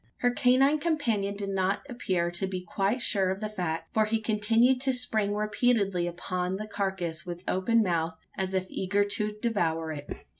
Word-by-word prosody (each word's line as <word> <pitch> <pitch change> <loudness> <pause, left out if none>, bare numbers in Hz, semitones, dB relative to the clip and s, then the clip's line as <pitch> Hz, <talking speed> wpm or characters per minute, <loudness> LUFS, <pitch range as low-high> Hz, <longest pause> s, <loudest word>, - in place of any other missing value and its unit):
Her 245 - +4
canine 265 +5 +4
companion 235 -12 0
did 200 -1 -4
not 190 0 0
appear 185 -9 -1
to 175 +2 0
be 185 -1 -4
quite 200 +7 0
sure 190 -2 +2
of 190 +1 -2
the 215 - -2
fact: 175 -6 -4
for 215 -1 +3
he 220 +1 0
continued 225 +4 +3
to 265 -1 +1
spring 215 -4 0
repeatedly 210 -4 +1
upon 180 +1 -2
the 210 +2 -4
carcass 190 -6 -2
with 175 0 -7
open 225 +5 +2
mouth, 165 -3 -1 0.2
as 190 0 -2
if 185 0 0
eager 200 +2 +1
to 210 +1 -1
devour 165 -8 0
it. 145 -2 -7
200 Hz, 180 wpm, -28 LUFS, 180-225 Hz, 0.2 s, Her